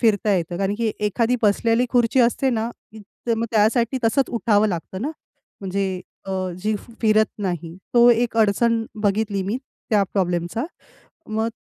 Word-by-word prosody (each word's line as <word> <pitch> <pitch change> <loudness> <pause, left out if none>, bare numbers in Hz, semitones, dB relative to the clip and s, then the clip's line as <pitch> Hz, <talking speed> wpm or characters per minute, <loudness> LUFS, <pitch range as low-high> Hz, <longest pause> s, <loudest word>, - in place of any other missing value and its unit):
फिरता 215 -3 +3
येतं. 175 -1 -2
कारण 195 +1 0
की 225 -2 +1
एखादी 225 +4 +1
बसलेली 230 +4 +3
खुर्ची 245 +1 +3
असते 245 +3 +2
ना, 230 -1 -1 0.6
तर 230 - +2
मग 230 +1 -2
त्यासाठी 230 +4 +2
तसंच 265 +5 +3
उठावं 215 -2 +2
लागतं 185 +1 -4
ना, 290 - -1 0.5
म्हणजे 190 -1 -2 0.3
अ, - - -5 0.3
जी 215 +1 +1
फ 235 - -14
फिरत 215 -1 +4
नाही. 175 -4 -3 0.2
तो 240 0 +7
एक 235 0 +1
अडचण 225 +1 +3 0.2
बघितली 205 -1 +1
मी 205 +6 -2 0.3
त्या 210 -2 +4
प्रॉब्लेमचा. 180 +4 -1 0.6
मग 220 +1 -1
215 Hz, 155 wpm, -22 LUFS, 195-235 Hz, 0.6 s, तो